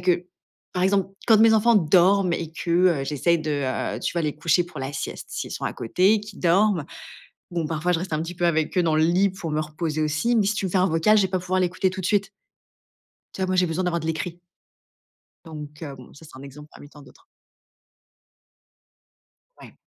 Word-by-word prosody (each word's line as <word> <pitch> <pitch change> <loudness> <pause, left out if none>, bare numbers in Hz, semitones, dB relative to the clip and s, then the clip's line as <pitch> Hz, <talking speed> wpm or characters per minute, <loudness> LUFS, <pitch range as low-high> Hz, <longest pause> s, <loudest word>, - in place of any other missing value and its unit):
que 180 0 +1 0.5
par 180 0 0
exemple, 195 -1 +2 0.2
quand 220 -3 +6
mes 225 0 +6
enfants 225 +2 +4
dorment 185 +1 +4
et 165 -1 -3
que, 170 - -5 0.3
heu, 135 - -3
j'essaye 165 +4 +1
de, 155 - -3 0.5
heu, - - -5
tu - - -2
vois, 170 - -1
les 150 -1 -2
coucher 165 +3 +2
pour 175 -4 -11
la 135 +2 -4
sieste, - - -6
s'ils - - -5
sont - - -5
à - - -2
côté, 190 - +2
qu'ils 210 -1 -11
dorment. 180 -1 +2 0.7
Bon, 170 -3 -2
parfois, 165 +3 -1
je 165 - +1
reste 180 -2 -4
un 155 - -1
petit 170 +2 -6
peu 175 0 0
avec 160 0 0
eux - - +4
dans 160 -2 +1
le 155 - +3
lit 185 +4 +3
pour 180 -3 -6
me 150 0 0
reposer 155 0 -3
aussi. 155 +11 0
Mais 210 -3 +2
si 210 - +1
tu 200 - -3
me 185 - -4
fais 190 - +1
un 185 - +3
vocal, 165 +7 +3
je - - +4
vais 190 - 0
pas 185 0 -1
pouvoir 185 +1 -1
l'écouter 185 +1 0
tout 190 - -6
de 185 - -3
suite. 200 -1 +1 1.0
Tu - - -7
vois, 185 - 0
moi, 185 - 0
j'ai 180 -1 +3
besoin 165 +3 -2
d'avoir 170 -1 0
de 160 - -7
l'écrit. 170 +2 -4 1.1
Donc 150 -1 -9
heu, 140 -3 -7
bon 125 -2 -14
ça, 160 - -15
c'est 140 -4 -14
un - - -11
exemple 145 +2 -12
parmi 145 - -14
tant 145 0 -15
d'autres. - - -20 2.4
Ouais. - - -14
175 Hz, 230 wpm, -24 LUFS, 155-190 Hz, 2.4 s, quand